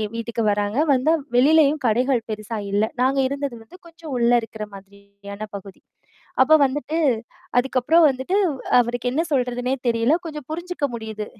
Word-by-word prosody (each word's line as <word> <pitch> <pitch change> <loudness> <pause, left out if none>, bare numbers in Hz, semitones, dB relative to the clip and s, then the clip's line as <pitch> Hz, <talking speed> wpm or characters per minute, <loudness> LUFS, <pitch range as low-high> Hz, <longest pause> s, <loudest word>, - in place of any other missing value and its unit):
வீட்டுக்கு 230 0 -3
வராங்க 205 +3 -1
வந்தா 275 +5 +3 0.2
வெளிலயும் 300 +3 +4
கடைகள் 245 +2 +2
பெருசா 215 +1 -5
இல்ல. 205 +2 +2 0.2
நாங்க 270 +1 +2
இருந்தது 280 -2 -4
வந்து 295 +11 -16
கொஞ்சம் 330 -4 -10
உள்ள 235 0 +3
இருக்குற 220 -1 -7
மாதிரியான 200 +1 -11
பகுதி 195 -1 -13 0.6
அப்போ 315 +4 +6
வந்துட்டு 295 +4 -3 0.6
அதுக்கப்புறம் 265 +6 +3
வந்துட்டு, 265 +8 -1 0.4
அவருக்கு 245 +1 -1
என்னா 320 +5 0
சொல்றதுனே 250 -1 0
தெரியல! 230 +5 +2
கொஞ்சம் 300 -4 -7
புரிஞ்சுக்க 345 -1 -3
முடியுது. 220 -2 -5
250 Hz, 135 wpm, -22 LUFS, 220-290 Hz, 0.6 s, அப்போ